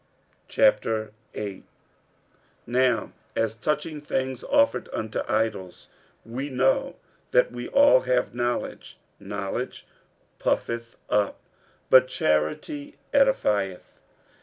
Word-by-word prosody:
46:008:001 110 - 0 1.0
Now 125 -1 +1 0.2
as 115 -1 +1
touching 150 +6 -2
things 130 -3 -2
offered 285 0 +2
unto 110 0 -3
idols, 110 -5 -2 0.4
we 130 +5 -4
know 135 - +1 0.3
that - - +3
we - - -6
all 280 - +6
have 125 -2 0
knowledge. 120 0 -3 0.2
Knowledge 100 +4 -4 0.5
puffeth 115 0 -1
up, 105 -1 +1 0.5
but 130 0 +8
charity 205 - -1 0.2
edifieth. 105 - +1
120 Hz, 85 wpm, -26 LUFS, 105-150 Hz, 1.0 s, but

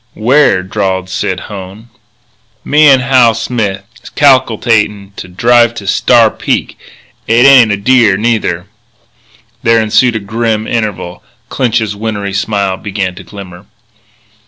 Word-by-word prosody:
"Where?" 120 -5 +2
drawled 95 -1 -3
Sid 95 0 -3
Hone. 100 +3 -10 0.8
"Me 150 +1 +3
an' 135 -2 +5
Hal 125 -3 +3
Smith 110 -5 -3 0.2
is - - -13
cal'kalatin' 115 -7 +1
to - - -9
drive 120 +5 +1
Star 115 +2 +3
Peak. - - -3 0.5
It 120 +3 +3
ain't 130 -5 +6
a 100 - -1
deer, 110 -2 +2
neither." 105 -6 -2 1.0
There 115 -2 +2
ensued 110 +2 +1
a - - -1
grim 110 +1 -3
interval. 105 -7 -4 0.3
Clinch's 110 -4 -1
wintry 100 -2 -5
smile 100 -1 -2
began 100 -2 -4
to 90 - -12
glimmer. 95 -2 -12
110 Hz, 125 wpm, -11 LUFS, 100-120 Hz, 1.0 s, ain't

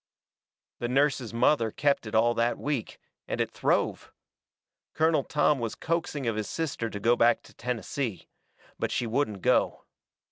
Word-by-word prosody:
The 120 - -1
nurse's 135 -2 +1
mother 115 0 +3
kept 140 0 0
it 105 - -4
all 120 +2 +4
that 120 +1 +1
week, 145 -6 -3 0.3
and - - -3
it - - 0
throve. - - 0 0.8
Colonel 160 -2 +3
Tom 150 0 +2
was 115 -2 -3
coaxing 165 -4 -2
of 115 -2 0
his 105 -2 -3
sister 145 -8 -2
to 105 - -6
go 115 +4 +3
back 120 0 +3
to - - -17
Tennessee. 125 -2 -4 0.5
But - - 0
she 120 - 0
wouldn't 110 -5 -1
go. - - +2
120 Hz, 155 wpm, -28 LUFS, 115-145 Hz, 0.8 s, all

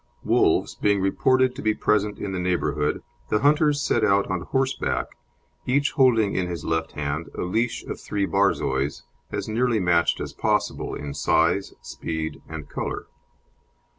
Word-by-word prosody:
Wolves - - +2
being 100 -1 +1
reported 130 +7 +2
to - - -6
be 110 -1 +1
present 105 0 +1
in 100 - -4
the 95 - -2
neighbourhood, 75 -5 0 0.3
the 105 - +1
hunters 150 0 +3
set 115 - +1
out 100 -1 +3
on 95 -2 -1
horseback, 135 +7 -1 0.6
each 140 +4 +2
holding 115 -7 +3
in 90 -1 0
his 85 -3 -5
left 80 0 -1
hand 75 +2 -3
a - - -2
leash 110 +7 -1
of - - -6
three 100 -1 -1
Borzois, 75 -9 0 0.3
as - - -3
nearly 115 +1 +1
matched 85 -3 +2
as - - -5
possible - - -1
in 70 -1 -6
size, 85 +7 +1
speed, 80 -1 -5
and 80 -2 -7
colour. - - -4
100 Hz, 155 wpm, -24 LUFS, 80-115 Hz, 0.6 s, hunters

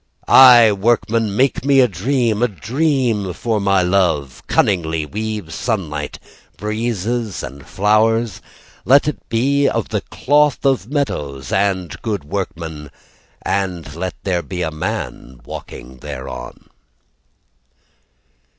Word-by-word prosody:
Aye, 120 -4 +8
workman, 110 0 +1
make 135 0 +2
me 140 0 +4
a 125 - +6
dream, 115 - 0
A 125 - +4
dream 120 - -1
for 110 +5 -1
my 100 -2 +3
love. 90 -8 0
Cunningly 80 -5 +1
weave 105 -2 -5
sunlight, 80 - -3 0.4
Breezes, 110 0 -2
and 70 +2 -9
flowers. 110 +1 +1 0.4
Let 140 +4 +5
it 150 - -2
be 140 +5 +2
of - - -2
the - - -1
cloth 145 0 +1
of 130 -5 +1
meadows. 75 - -3
And 95 -4 -1
good 105 -8 -3
workman 80 -3 -5 0.5
And 90 -7 -2
let 90 +2 -4
there 90 -3 0
be 90 +3 -4
a 80 - -2
man 80 - -5
walking 65 +2 -9
thereon. 65 -3 -8
100 Hz, 115 wpm, -19 LUFS, 85-120 Hz, 0.5 s, Aye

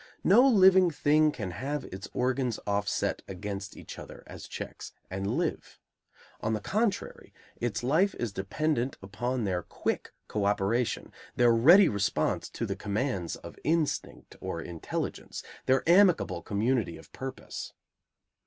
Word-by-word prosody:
No 205 +7 +7
living 190 -6 +6
thing 150 0 +3
can 105 -10 -5
have 140 +8 -3
its 95 +1 -7
organs 125 -2 0
offset 100 0 0
against 100 +1 -6
each - - -9
other, - - -10
as - - -10
checks, - - -7 0.2
and 95 +1 -2
live. - - -3 0.6
On 110 - -1
the 110 - 0
contrary, 210 - -2 0.2
its 120 -1 -2
life 165 +10 +3
is 115 -5 -3
dependent 130 +7 -1
upon 120 +6 -2
their 90 -3 0
quick - - -3 0.2
co 105 -2 -1
operation, 105 +4 0 0.2
their 120 -1 +5
ready 170 - +7
response 100 -2 0
to - - -4
the - - -3
commands 105 -4 -2
of - - -11
instinct 160 -1 -1
or - - -4
intelligence, 85 -2 -5 0.2
their 130 +3 +3
amicable 175 - +4
community 110 -2 0
of 80 - -16
purpose. 130 0 -6
120 Hz, 135 wpm, -29 LUFS, 100-155 Hz, 0.6 s, No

